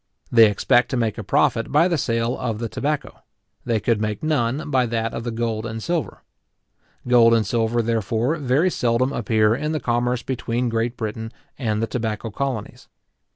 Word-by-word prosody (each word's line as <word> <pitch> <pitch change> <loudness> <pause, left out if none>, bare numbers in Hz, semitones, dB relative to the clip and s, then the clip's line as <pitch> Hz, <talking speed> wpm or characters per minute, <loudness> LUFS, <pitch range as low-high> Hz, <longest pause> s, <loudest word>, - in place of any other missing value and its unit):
They 115 -2 +7
expect 120 +4 +2
to 130 - -1
make 115 -3 -1
a - - -4
profit - - +1
by 150 +5 +4
the 175 - +1
sale 115 -3 0
of 115 -4 -2
the 115 +1 -3
tobacco; 145 +6 -3 0.4
they 115 -2 +1
could 110 0 0
make 105 +2 -3
none 145 -1 0
by 130 -2 +2
that 115 0 -2
of 115 - -4
the 120 - -3
gold 115 -1 -2
and 110 0 -5
silver. 170 -3 -3 0.8
Gold 115 -2 +6
and 110 -2 +1
silver, 115 +2 0
therefore, 115 - 0
very 145 +5 +2
seldom 125 +1 +1
appear 110 -2 +2
in 150 +5 -2
the 155 - -1
commerce 120 0 0
between 120 -1 -2
Great 115 +1 -1
Britain 110 0 -4 0.3
and 110 -4 -1
the - - 0
tobacco 110 -1 -3
colonies. 130 -2 -4
115 Hz, 180 wpm, -22 LUFS, 110-130 Hz, 0.8 s, They